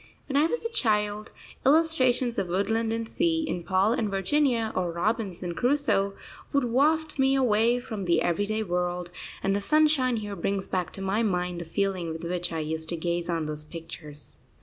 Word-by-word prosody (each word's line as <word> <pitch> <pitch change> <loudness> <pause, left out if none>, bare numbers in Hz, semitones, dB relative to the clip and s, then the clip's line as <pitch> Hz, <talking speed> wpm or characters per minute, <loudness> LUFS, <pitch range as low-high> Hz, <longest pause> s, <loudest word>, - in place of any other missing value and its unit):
When 275 - -4
I 295 +3 +5
was 465 +6 -3
a 460 - -2
child, 210 - 0 0.3
illustrations 260 -5 +3
of 185 - -1
woodland 220 +5 0
and 225 0 -2
sea, 325 +3 0
in 180 - -2
Paul 190 +4 +2
and 225 -4 0
Virginia, 230 +3 +1
or 180 -2 0
Robinson 180 -1 -2
Crusoe, 245 - +1 0.4
would 280 -1 +2
waft 300 +5 +1
me 270 0 +4
away 240 -1 +3
from 215 -5 -5
the 170 - +2
everyday 205 +5 0
world; 180 -1 -2 0.3
and 195 0 +2
the 200 - 0
sunshine 295 -2 +3
here 205 -2 -4
brings 195 0 -2
back 180 -3 -2
to 195 - -6
my 195 +4 +1
mind 180 -4 -1
the - - -6
feeling 185 0 -1
with 160 +1 -6
which 175 0 -2
I 165 -1 -2
used 160 +1 -4
to 170 - -1
gaze 170 +1 -2
on 165 -2 0
those 150 0 -5
pictures. 155 -2 -10
205 Hz, 185 wpm, -27 LUFS, 175-250 Hz, 0.4 s, I